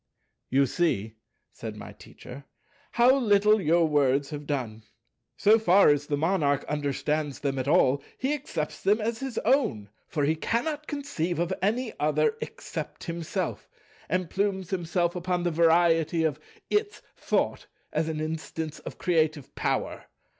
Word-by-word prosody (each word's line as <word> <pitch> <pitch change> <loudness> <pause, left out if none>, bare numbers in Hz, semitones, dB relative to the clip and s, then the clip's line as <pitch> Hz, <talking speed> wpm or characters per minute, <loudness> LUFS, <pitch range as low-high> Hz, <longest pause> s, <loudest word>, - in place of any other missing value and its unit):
"You 135 +2 +4
see," 115 - -1 0.3
said 110 -2 -7
my 105 - -9
Teacher, 135 +3 -12 0.5
"how 245 +3 +5
little 210 -2 +4
your 165 0 +3
words 140 -1 +2
have 145 -1 -6
done. 120 -7 -3 0.6
So 220 +2 +5
far 195 -3 +5
as 145 0 +2
the 145 - 0
Monarch 150 -3 +1
understand 150 0 -1
them 135 -1 -3
at 130 - -3
all, 140 -1 +4 0.2
he 265 +3 0
accepts 175 - -4
them 210 +3 +3
as 225 +1 -2
his 270 -4 -5
own—for 145 - 0
he 155 +3 +2
cannot 290 - -2
conceive 275 - -3
of 175 +2 0
any 225 +5 0
other 155 - +2
except - - -6
himself—and 170 +1 -4
plumes 195 -2 -1
himself 175 -1 0
upon 180 0 -1
the 175 - +1
variety 165 0 +3
of 150 -2 0 0.3
'Its 420 0 0
Thought' - - -1 0.3
as 155 +1 0
an 155 -1 -3
instance 155 0 -4
of - - -9
creative 155 -5 0
Power. - - -2
165 Hz, 140 wpm, -27 LUFS, 145-200 Hz, 0.6 s, how